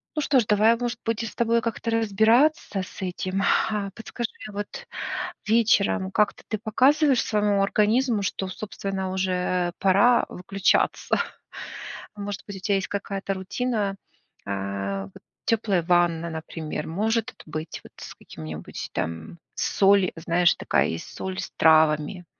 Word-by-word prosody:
Ну 300 - 0
что 275 -2 +3
ж, 225 - +1
давай, 215 +2 +5
может 240 -1 -3
быть, 225 0 0
с 225 - -6
тобой 235 0 +2
как-то 230 0 -3
разбираться 225 - +3
с 185 - -9
этим. 185 +1 -2 0.3
А 205 -2 -2
подскажи, 235 +1 -4 0.2
вот 205 0 -6 0.6
вечером 210 -4 +3
как-то 210 +1 +1
ты 215 - -2
показываешь 265 +5 +3
своему 205 -2 +2
организму, 215 +2 +2
что, 190 0 -2
собственно, 195 -1 -4
уже 180 -1 0
пора 200 +6 +4
выключаться? 195 +2 +1 1.0
Может 205 -1 -5
быть, 200 -2 -7
у - - -9
тебя 200 +1 +1
есть 195 - -2
какая-то 195 -1 -3
рутина, 205 +1 -2 0.5
а, 100 0 -3
вот 95 - -16 0.3
тёплая 205 -6 +2
ванна, 170 -1 +2
например, 160 -1 -5
может 220 +6 0
т - - -9
быть, 155 +1 -6
вот, - - -14
с - - -9
каким-нибудь 80 -1 -8
там 80 - -4 0.2
соль, 195 -1 +3
знаешь, 170 +1 +3
такая - - +1
есть 80 0 -5
соль 190 0 -4
с - - -6
травами. 160 +2 +4
195 Hz, 140 wpm, -25 LUFS, 175-220 Hz, 1.0 s, давай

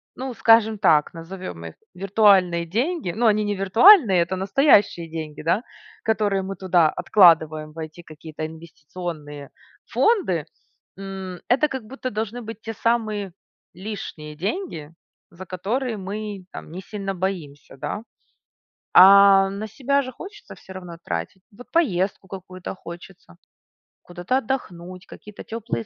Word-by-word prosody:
ну, 260 0 -5
скажем 225 -1 +4
так, 155 -7 +3
назовем 165 - -8
их 80 - -9 0.2
виртуальные 190 -3 +3
деньги- 260 - -1
ну, 240 - 0
они 215 -1 +3
не 205 0 -1
виртуальные, 225 - +7
это 170 +2 -1
настоящие 195 - +3
деньги, 155 -2 -7
да, 190 +8 +1 0.5
которые 205 -3 +1
мы 195 +1 -5
туда 175 -3 +3
откладываем 160 -5 +4
в - - -20
эти 155 +2 -8
какие-то 155 0 -9
инвестиционные 155 -2 -8 0.5
фонды, 275 - +2 0.5
м, 190 -2 -7
это 270 +5 +3
как 265 -3 -6
будто 255 +2 -6
должны 220 +3 -4
быть 225 0 -9
те 225 - -6
самые 215 -4 -1 0.4
лишние 175 -6 -7
деньги, 175 - -4 0.4
за 175 +2 -10
которые 220 +7 -3
мы, 200 0 -6
там, - - -10
не 185 +3 -7
сильно 195 -1 -5
боимся, 170 -8 -5
да. 210 - -5 0.9
А 195 0 +8
на 205 +2 -5
себя 280 +6 0
же 255 -1 -7
хочется 405 - -11
все 190 - -13
равно 180 -3 -9
тратить. 85 - -4
Вот 235 +5 -15
поездку 195 - 0
какую-то 185 0 -8
хочется, 170 - -12 0.7
куда-то 175 +8 -2
отдохнуть, 185 -8 -5
какие-то 210 -1 -12
теплые 230 0 -4
195 Hz, 135 wpm, -23 LUFS, 170-220 Hz, 0.9 s, А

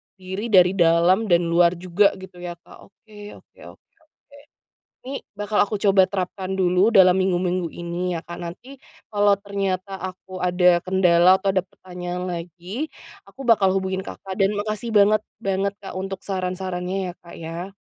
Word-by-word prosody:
diri 190 +4 -5
dari 185 -4 +5
dalam 170 +5 +4
dan 175 -1 +3
luar 170 +1 +4
juga 185 +3 +2
gitu 185 -1 -12
ya, 175 -1 -5
Kak. - - -16
Oke 210 0 -13
oke - - -21 0.2
oke - - -46
oke. 305 -2 -23 0.7
Nih, 275 - -3 0.2
bakal 205 +1 -2
aku 205 -1 -4
coba 195 -2 +5
terapkan 190 0 -4
dulu 185 +4 +2
dalam 185 -1 +7
minggu-minggu 180 -2 0
ini 175 +1 -3
ya, 165 - -3
Kak. 175 +1 -9
Nanti 215 +11 -9 0.3
kalo 205 -1 +3
ternyata 195 -1 -3
aku 185 0 -8
ada 180 -1 +3
kendala 185 0 +4
atau 195 -1 +1
ada 185 - +2
pertanyaan 180 0 -6
lagi, 180 - -6 0.3
aku 260 +8 -11
bakal 195 -4 +4
hubungin 190 0 -2
Kakak 190 -1 -8
dan 195 +1 +3
makasih 215 +2 -3
banget, 210 +1 +4 0.2
banget, 195 +1 0
Kak, 195 - -8
untuk 195 0 -5
saran-sarannya 185 0 -3
ya, - - -8
Kak, 170 - -12
ya. 170 +4 -6
190 Hz, 160 wpm, -22 LUFS, 180-200 Hz, 0.7 s, dalam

